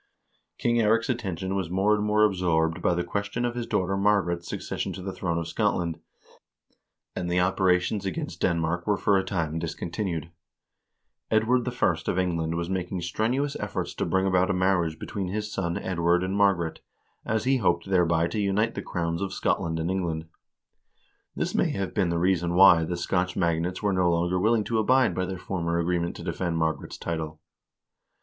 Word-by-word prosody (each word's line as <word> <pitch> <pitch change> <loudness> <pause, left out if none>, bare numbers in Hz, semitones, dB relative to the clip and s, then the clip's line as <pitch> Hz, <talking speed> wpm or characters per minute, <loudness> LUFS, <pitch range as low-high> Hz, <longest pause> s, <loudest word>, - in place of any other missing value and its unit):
King 120 0 +1
Eirik's 115 +1 +2
attention 95 -5 -3
was 95 -4 -2
more 95 +4 +2
and 105 0 +1
more 105 0 +3
absorbed 90 -4 +1
by 90 - +2
the 90 - 0
ques 100 +3 -2
tion 120 +3 -1
of 120 - -1
his 120 -1 -4
daughter 95 +1 0
Margaret's 95 -4 +1
succession 95 - -4
to 95 - -7
the 95 0 -4
throne 85 -3 -2
of 85 -1 -3
Scotland, 85 -4 0 1.2
and 90 -1 -3
the 90 +1 +2
operations 95 +2 +2
against 90 -2 -4
Denmark 85 +1 0
were 105 -1 +2
for 100 - +2
a - - -1
time 85 -5 -2
discontinued. 85 0 -4 1.0
Edward 115 +3 +2
I. 120 -7 +2
of - - 0
England 85 -3 0
was 85 0 -2
making 95 -1 -3
strenuous 120 +11 -1
efforts - - -3
to - - -2
bring 95 0 +1
about 95 -1 +2
a 95 - +1
marriage 90 -4 +1
between 100 -3 -4
his 105 +3 -3
son 85 -3 -1
Edward 85 -1 +1
and 95 +1 -2
Margaret, 95 -5 +1 0.4
as 110 0 -1
he 135 +1 +3
hoped 95 -5 +1
thereby 85 -3 +3
to 105 - -3
unite 105 +3 +1
the - - -4
crowns 85 -1 -2
of 100 -1 -2
Scotland 80 -1 0
and 80 +3 -1
England. 85 -4 -2 1.1
This - - -2
may - - +2
have 95 -1 -3
been 95 -5 +1
the 85 - 0
reason 85 -1 +1
why 90 -3 +7
the 85 +2 -3
Scotch 90 +1 -1
magnates 85 +1 0
were 100 -1 +2
no 90 -1 +2
longer 85 +2 +1
will 110 +5 +3
ing 110 - +1
to 115 +1 0
abide 125 -1 +3
by 90 +1 -1
their 95 0 -4
former 85 -2 -2
agreement 85 0 0
to - - -8
defend 85 -3 -2
Margaret's 80 -3 -2
title. 80 -2 -4
90 Hz, 185 wpm, -26 LUFS, 85-100 Hz, 1.2 s, why